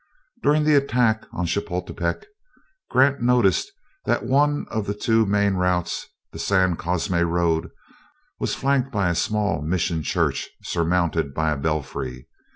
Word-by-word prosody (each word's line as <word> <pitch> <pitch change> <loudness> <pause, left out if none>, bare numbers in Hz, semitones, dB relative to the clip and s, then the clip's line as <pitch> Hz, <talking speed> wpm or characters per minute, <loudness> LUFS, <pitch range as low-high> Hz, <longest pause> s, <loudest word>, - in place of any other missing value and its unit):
During 150 +1 +3
the 150 0 +3
attack 125 -5 +2
upon 90 - -4
Chapultepec, 90 - -3 0.6
Grant 135 +1 +3
noticed 125 - +3 0.3
that - - 0
one 145 +4 +2
of 110 -2 -2
the 100 - -2
two 110 0 +2
main 100 0 +2
routes, 90 -2 -1 0.2
the - - -9
San 95 -3 +2
Cosme 90 +2 -1
road, 85 0 +1 0.7
was - - -1
flanked 135 -1 +1
by 100 -6 +1
a - - +1
small 105 +3 0
mission 85 +1 -1
church - - -1
surmounted 85 -4 0
by 80 0 +1
a - - 0
belfry. 70 -4 -3
95 Hz, 140 wpm, -23 LUFS, 85-120 Hz, 0.7 s, During